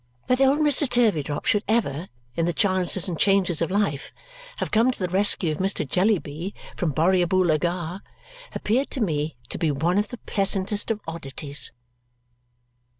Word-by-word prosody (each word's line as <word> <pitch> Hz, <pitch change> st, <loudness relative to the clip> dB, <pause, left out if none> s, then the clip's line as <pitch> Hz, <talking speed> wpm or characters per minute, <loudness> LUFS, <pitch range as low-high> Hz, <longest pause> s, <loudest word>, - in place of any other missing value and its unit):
That 255 Hz, +1 st, +1 dB
old 270 Hz, +2 st, +4 dB
Mr. 295 Hz, -2 st, +3 dB
Turveydrop 165 Hz, -, +1 dB
should 210 Hz, -1 st, +2 dB
ever, 195 Hz, -7 st, -1 dB, 0.3 s
in 165 Hz, -, 0 dB
the 175 Hz, -, 0 dB
chances 185 Hz, -1 st, +2 dB
and 170 Hz, -4 st, -4 dB
changes 195 Hz, -5 st, +2 dB
of 165 Hz, -, 0 dB
life, 185 Hz, -8 st, -1 dB, 0.5 s
have -, -, -4 dB
come 230 Hz, +3 st, +3 dB
to 255 Hz, -, -1 dB
the 185 Hz, -, -2 dB
rescue 185 Hz, -2 st, +2 dB
of 155 Hz, -, -4 dB
Mr. 190 Hz, -5 st, 0 dB
Jellyby 180 Hz, 0 st, -1 dB, 0.2 s
from 175 Hz, -5 st, -1 dB
Borrioboola 175 Hz, +1 st, +2 dB
Gha 175 Hz, +2 st, -3 dB, 0.5 s
appeared 250 Hz, +6 st, 0 dB
to 270 Hz, -, -2 dB
me 155 Hz, -, -1 dB
to -, -, -4 dB
be 165 Hz, -, +1 dB
one 165 Hz, +7 st, +1 dB
of 210 Hz, -, -1 dB
the 245 Hz, -, -7 dB
pleasantest 200 Hz, 0 st, 0 dB
of 220 Hz, -2 st, -2 dB
oddities. 145 Hz, -3 st, -2 dB
185 Hz, 160 wpm, -24 LUFS, 165-210 Hz, 0.5 s, old